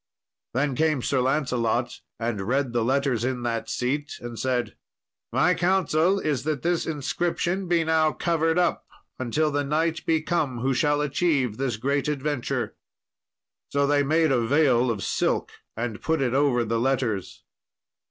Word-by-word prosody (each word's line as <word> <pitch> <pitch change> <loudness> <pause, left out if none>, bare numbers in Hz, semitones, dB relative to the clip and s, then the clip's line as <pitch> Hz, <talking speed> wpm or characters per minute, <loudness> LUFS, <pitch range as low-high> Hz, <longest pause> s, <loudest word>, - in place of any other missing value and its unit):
Then 140 +1 +1
came 155 -1 +1
Sir 130 -2 +1
Lancelot 125 -3 0 0.2
and 115 -3 -2
read 130 0 0
the 120 -1 +1
letters 130 -2 +1
in 125 -1 -2
that 115 -1 -2
seat, 145 +4 -2
and 120 -2 -7
said, 125 0 -1 0.6
"My 180 +3 +3
counsel 180 0 +2
is 150 -7 -1
that 150 -1 -2
this 175 0 0
inscription 175 +5 -1
be 170 -1 +2
now 160 -1 +3
covered 165 0 0
up 180 -1 +1 0.3
until 150 +5 0
the 145 0 0
knight 160 +3 0
be 160 -1 +2
come 155 -7 -1
who 135 +1 +1
shall 145 +3 +2
achieve 145 -6 0
this 130 -4 -1
great 140 +5 0
adventure." 135 -5 -2 1.0
So 140 0 +1
they 145 0 +3
made 155 +2 +2
a 125 -3 +3
veil 130 -1 +3
of 110 -4 -2
silk - - 0 0.3
and 115 -2 -3
put 160 -1 0
it 130 -3 0
over 135 -4 +2
the 115 +1 0
letters. 120 -6 -1
140 Hz, 155 wpm, -25 LUFS, 125-155 Hz, 1.0 s, My